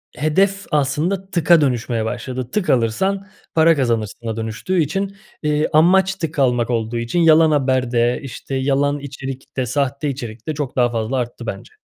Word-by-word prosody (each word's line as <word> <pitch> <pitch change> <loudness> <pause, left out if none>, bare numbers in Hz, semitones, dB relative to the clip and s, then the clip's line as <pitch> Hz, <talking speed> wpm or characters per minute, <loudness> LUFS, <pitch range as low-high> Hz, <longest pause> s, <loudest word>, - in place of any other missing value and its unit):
hedef 195 +6 +1
aslında 155 +7 0
tıka 170 -2 +4
dönüşmeye 120 -4 0
başladı. 125 +2 -4
Tık 210 -3 -1
alırsan 190 - +1 0.3
para 165 0 +5
kazanırsına 115 -3 -2
dönüştüğü 115 +12 -2
için, 195 +6 -2 0.3
eee, 150 0 +1
amaç 185 +4 +4
tık 165 -4 -4
almak 125 -3 +2
olduğu 115 -1 -1
için 115 +8 -1
yalan 160 -1 +6
haber 130 -4 +1
de, 120 0 +2
işte, 135 0 -6
yalan 140 +2 +1
içerik 135 -1 -8
de, 130 - +1
sahte 140 +3 -1
içerik 120 -4 -7
de 155 - -1
çok 145 -3 -4
daha 120 -2 +2
fazla 115 +3 -2
arttı 120 -1 -4
bence. 95 -2 -6
135 Hz, 160 wpm, -20 LUFS, 120-160 Hz, 0.3 s, yalan